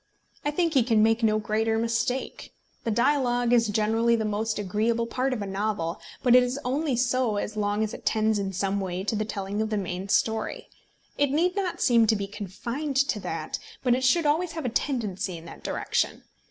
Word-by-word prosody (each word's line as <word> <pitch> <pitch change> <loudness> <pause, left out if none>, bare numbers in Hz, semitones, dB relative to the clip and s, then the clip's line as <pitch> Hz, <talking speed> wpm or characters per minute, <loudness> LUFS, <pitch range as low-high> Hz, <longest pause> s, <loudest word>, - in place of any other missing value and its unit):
I 295 - 0
think 330 +2 0
he 270 - +5
can 225 -2 +3
make 225 +1 +3
no 215 -1 +3
greater 220 +1 0
mistake. 230 +3 -2 0.3
The - - 0
dialogue 245 0 +2
is 230 -2 +4
generally 225 +3 +2
the 220 -1 -1
most 215 +1 -1
agreeable 215 +4 0
part 255 +3 -1
of 230 -5 -2
a - - -4
novel; 195 -4 -2 0.2
but 245 -2 +6
it 250 - +8
is 250 +2 -1
only 275 +2 0
so 245 -2 +1
as 210 +1 -3
long 205 0 0
as 215 - -3
it - - -9
tends 220 -1 +2
in 195 -1 -2
some 195 +1 -1
way 185 -1 -3
to 215 - -1
the 215 0 -1
telling 200 0 -3
of 220 - -1
the 215 - -1
main 185 0 -4
story. 220 +2 0 0.5
It 285 -1 +3
need 340 +6 +1
not 385 -3 -2
seem 230 -2 +5
to 220 - +4
be 200 -1 -2
confined 235 - -5
to 270 -5 +2
that, 160 -5 -4 0.2
but 250 -2 +3
it 255 +1 0
should 310 +6 +3
always 320 +4 +1
have 320 -4 -5
a - - +1
tendency 210 -8 -2
in 165 - -12
that 170 - -11
direction. - - -1
225 Hz, 210 wpm, -26 LUFS, 205-255 Hz, 0.5 s, it